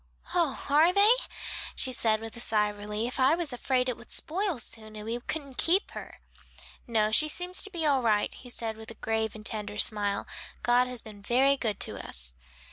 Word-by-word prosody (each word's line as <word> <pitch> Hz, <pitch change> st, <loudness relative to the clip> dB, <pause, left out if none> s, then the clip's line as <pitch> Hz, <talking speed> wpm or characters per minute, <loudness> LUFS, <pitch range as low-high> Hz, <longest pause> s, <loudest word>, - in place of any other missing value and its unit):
"Oh, 335 Hz, -6 st, 0 dB
are 305 Hz, +5 st, +5 dB
they?" 400 Hz, +3 st, +7 dB, 0.6 s
she 260 Hz, -, +3 dB
said 220 Hz, -2 st, +2 dB
with 225 Hz, +1 st, -8 dB
a -, -, -7 dB
sigh 210 Hz, -3 st, +3 dB
of 205 Hz, -, -14 dB
relief, 210 Hz, +5 st, -4 dB
"I 265 Hz, +5 st, +4 dB
was 335 Hz, -6 st, -3 dB
afraid 250 Hz, +1 st, 0 dB
it 250 Hz, -, 0 dB
would 235 Hz, -, -15 dB
spoil 370 Hz, 0 st, +1 dB
soon 220 Hz, -2 st, -9 dB
and 210 Hz, 0 st, -8 dB
we 230 Hz, +2 st, -3 dB
couldn't 275 Hz, 0 st, -6 dB
keep 370 Hz, +5 st, +3 dB
her." -, -, -10 dB, 0.7 s
"No, 215 Hz, -2 st, +1 dB
she 305 Hz, +7 st, +4 dB
seems 360 Hz, +3 st, 0 dB
to 405 Hz, -, +1 dB
be 340 Hz, -5 st, -2 dB
all 280 Hz, -3 st, +3 dB
right," 215 Hz, -3 st, +1 dB
he 250 Hz, -, -12 dB
said 225 Hz, -2 st, -4 dB
with 220 Hz, 0 st, -10 dB
a 230 Hz, -, -9 dB
grave 220 Hz, 0 st, -2 dB
and 215 Hz, 0 st, -11 dB
tender 210 Hz, -2 st, -4 dB
smile. 205 Hz, -2 st, 0 dB, 0.4 s
"God 245 Hz, +2 st, +3 dB
has 250 Hz, -2 st, -1 dB
been 210 Hz, -2 st, -12 dB
very 260 Hz, +6 st, +3 dB
good 220 Hz, -7 st, -3 dB
to -, -, -3 dB
us." 60 Hz, 0 st, +1 dB
235 Hz, 210 wpm, -28 LUFS, 215-280 Hz, 0.7 s, they